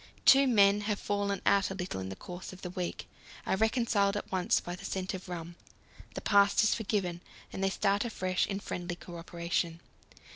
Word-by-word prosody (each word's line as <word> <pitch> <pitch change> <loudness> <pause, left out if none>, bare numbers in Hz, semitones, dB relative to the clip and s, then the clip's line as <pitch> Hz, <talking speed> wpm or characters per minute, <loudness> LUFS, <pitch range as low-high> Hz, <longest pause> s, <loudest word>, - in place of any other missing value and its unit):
Two 275 0 +7
men 205 -4 +5
who - - -6
have 210 -2 0
fallen 200 -1 -1
out 200 -1 +4
a 190 - -5
little 180 - -4
in 95 - -5
the 95 - -6
course 180 - -8
of 185 - -13
the 180 - -4
week 180 -1 -4 0.4
are - - +1
reconciled 220 -2 +2
at - - -6
once 185 -2 +2
by 175 - -6
the - - -12
scent 190 +1 -3
of 185 -1 -7
rum; 170 -1 -6 0.6
the - - -4
past 200 +1 +4
is 215 - +4
forgotten, 195 -6 -2 0.3
and 190 - -3
they 195 - +3
start 200 +1 +1
afresh 185 -6 -1
in 195 -1 -3
friendly 175 -3 -4
co 175 0 -10
operation. 170 0 -2
190 Hz, 205 wpm, -31 LUFS, 175-205 Hz, 0.6 s, Two